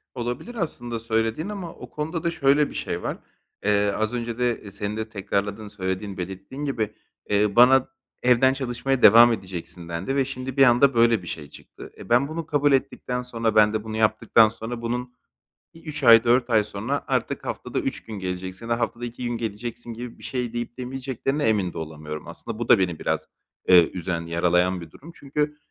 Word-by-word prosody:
Olabilir 125 - -4
aslında 120 - -4
söylediğin 115 - -1
ama 190 -5 -6
o - - -11
konuda 160 +2 -4
da 170 - +1
şöyle 145 -2 +3
bir - - -11
şey - - -3
var: - - -3 0.5
Eee, 105 0 +3
az 110 +2 -1
önce 120 -1 -3
de 120 -4 -1
senin 105 +1 -4
de 110 0 -4
tekrarladığın, 100 +1 -3
söylediğin, 95 -1 -4
belirttiğin 95 +10 -6
gibi, 115 -7 -2 0.4
eee, 105 0 +2
bana 130 +2 +6 0.4
"Evden 125 +1 +5
çalışmaya 135 0 -2
devam 115 +3 +8
edeceksin." 90 -4 -7
dendi 85 +10 -3
ve 135 -1 +2
şimdi 130 0 -6
bir 135 - +7
anda 130 +2 +5
böyle 115 -3 +4
bir - - -10
şey 75 -3 -6
çıktı. - - -13
E, - - -11
ben 125 +4 +4
bunu 160 +2 -5
kabul 145 -1 +2
ettikten 125 -2 0
sonra, 115 -3 -2
ben 105 0 +5
de 110 -1 -2
bunu 110 0 -5
yaptıktan 110 0 +4
sonra 115 +2 -6
bunun 125 +1 -3 0.6
bir 165 - -16
3 155 -2 -5
ay, 115 -2 +8
4 120 +1 +3
ay 110 -2 +4
sonra 110 +8 -3
artık - - -1
haftada - - -3
3 - - -3
gün 110 -3 -7
geleceksin, 95 +4 -5
ha 115 0 +1
haftada 120 0 -2
2 120 +1 -7
gün 120 -1 -2
geleceksin 115 +1 -5
gibi 120 +1 -8
bir - - -17
şey 125 -3 -3
deyip 120 0 -5
demeyeceklerine 135 +2 -3
emin 100 -5 0
de - - -8
olamıyorum. 75 -1 -7
Aslında 115 -2 -7
bu 120 - -4
da 115 - +7
beni 90 -4 -1
biraz, - - -1 0.4
eee, 90 -3 +7
üzen, 90 -2 -3
yaralayan 90 +2 +1
bir 80 -2 -11
durum. 165 +4 -13
Çünkü 150 +1 -2
115 Hz, 195 wpm, -24 LUFS, 100-130 Hz, 0.6 s, devam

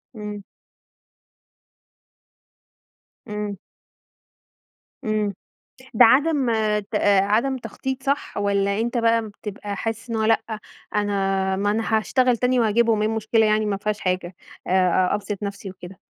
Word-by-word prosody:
إمم. 210 -1 -6 2.8
إمم. 210 -1 -4 1.5
إمم 215 -2 0 0.6
ده 245 - +8
عدم 275 +3 +4 0.4
ت - - -9 0.3
عدم 230 +7 +1
تخطِيط، 260 +3 -5
صح؟ 280 +2 -2
والَّا 200 0 +1
أنت 240 +2 -1
بقى 230 -1 +2
بتبقى 205 0 -7
حاسِس 225 +3 -4
إن 230 - -1
هو 220 - 0
لأ 225 +1 +3 0.5
أنا 195 -2 0
ما 205 +1 +1
أنا 220 +1 +1
هاشتغَل 250 +2 +2
تاني 250 +1 +2
وأجيبهم، 225 0 +3
إيه 215 - +2
المشكلة 220 0 +2
يعني؟ 215 0 +2
ما 205 -1 0
فيهاش 210 +1 -3
حاجة 180 -1 -2 0.3
آآ، - - -5
آآ، 185 -1 +3
أبسّط 205 0 -3
نفسي 200 -1 -5
وكده. 185 0 -12
215 Hz, 125 wpm, -23 LUFS, 200-230 Hz, 2.8 s, ده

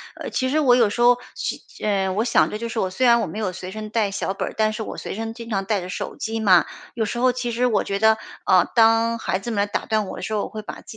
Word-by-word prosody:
呃 - - -6
其 260 0 -1
实 305 - +2
我 255 -5 +5
有 235 -4 +4
时 240 - -3
候 245 0 +6 0.2
去 - - -4 0.2
嗯 195 -3 +1
我 215 - +1
想 235 - +3
的 210 - -4
就 230 +1 -5
是， 235 - -6
我 190 - 0
虽 250 +7 +1
然 235 0 +5
我 - - -2
没 215 - -6
有 205 -4 -1
随 185 0 -7
身 215 +1 -6
带 215 -2 0
小 195 -1 -2
本 - - -3
儿， - - -11
但 215 0 +2
是 220 - -4
我 - - -7
随 - - -5
身 225 +1 -4
经 230 0 -9
常 195 -2 -1
带 205 -1 0
着 180 - -7
手 - - -5
机 225 0 -3
嘛。 190 -5 +5 0.3
有 225 -2 -1
时 215 - -4
候 255 +1 +3
其 245 -1 -3
实 240 +2 0
我 240 -3 +2
觉 195 - -2
得， 220 0 +5 0.3
啊 - - +4
当 225 0 +4
孩 190 -4 -2
子 235 - -6
们 205 -2 0
打 - - -1
断 215 -2 0
我 - - -7
的 - - -7
时 220 - -4
候， 210 - 0
我 - - -5
会 215 - -6
把 210 - -9
自 - - -13
220 Hz, 335 characters per minute, -22 LUFS, 205-235 Hz, 0.3 s, 候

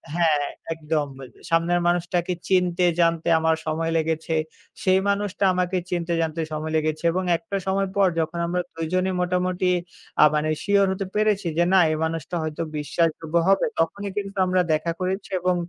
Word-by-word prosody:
হ্যাঁ, 155 -4 +2 0.3
একদম। 155 -2 -1 0.4
সামনের 165 +1 +2
মানুষটাকে 175 +1 0 0.2
চিনতে 180 -1 +2 0.2
জানতে 165 -1 +1
আমার 160 0 +2
সময় 165 +1 -1
লেগেছে। 160 0 -1 0.5
সেই 185 0 +4
মানুষটা 200 0 -1
আমাকে 180 0 0
চিনতে 175 -1 -1
জানতে 165 0 -2
সময় 155 +1 -3
লেগেছে 155 0 -1
এবং 185 +2 -1
একটা 200 +2 -4
সময় 195 0 +1
পর 200 -1 +4
যখন 160 +1 -2
আমরা 180 +1 0
দুইজনে 185 +3 -1
মোটামুটি 180 0 0 0.5
আ - - +9
মানে 150 +1 0
শিওর 200 -1 +4
হতে 190 +1 -3
পেরেছি 210 -3 +1
যে 170 - +4
না, - - +6
এই 155 - -1
মানুষটা 160 0 -3
হয়তো 155 0 -4 0.2
বিশ্বাসযোগ্য 160 +1 -1 0.2
হবে 195 - +4
তখনই 195 +5 -1
কিন্তু 200 0 -4
আমরা 185 0 +3
দেখা 155 +2 0
করেছি 190 +2 -2
এবং 180 0 +1
175 Hz, 160 wpm, -24 LUFS, 160-185 Hz, 0.5 s, আ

